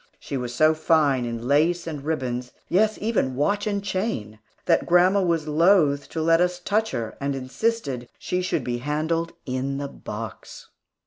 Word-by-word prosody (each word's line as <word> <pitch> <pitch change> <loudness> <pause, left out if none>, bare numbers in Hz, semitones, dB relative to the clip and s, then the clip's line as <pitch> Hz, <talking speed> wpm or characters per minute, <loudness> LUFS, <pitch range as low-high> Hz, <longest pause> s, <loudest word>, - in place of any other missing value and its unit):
She - - -6
was 125 -2 -3
so 155 +3 +5
fine 155 -5 +2
in 115 0 -4
lace 165 +5 +2
and 150 -4 -5
ribbons, 125 -5 -3
yes, 215 +4 +2
even 210 - 0
watch 205 - 0
and 200 -1 -1
chain, 185 - -3 0.3
that 165 - +2
grandma 180 +3 +5
was 165 -4 0
loath 150 -3 +3
to 160 - -3
let 165 +1 +4
us 180 0 +1
touch 215 +4 0
her, 115 -4 -4
and 140 0 -1
insisted 135 - -2
she 180 - -2
should 180 - -1
be 120 -1 -2
handled 160 +5 -1
in 135 +1 -2
the 140 0 -3
box. 110 -4 -8
155 Hz, 170 wpm, -24 LUFS, 130-180 Hz, 0.3 s, so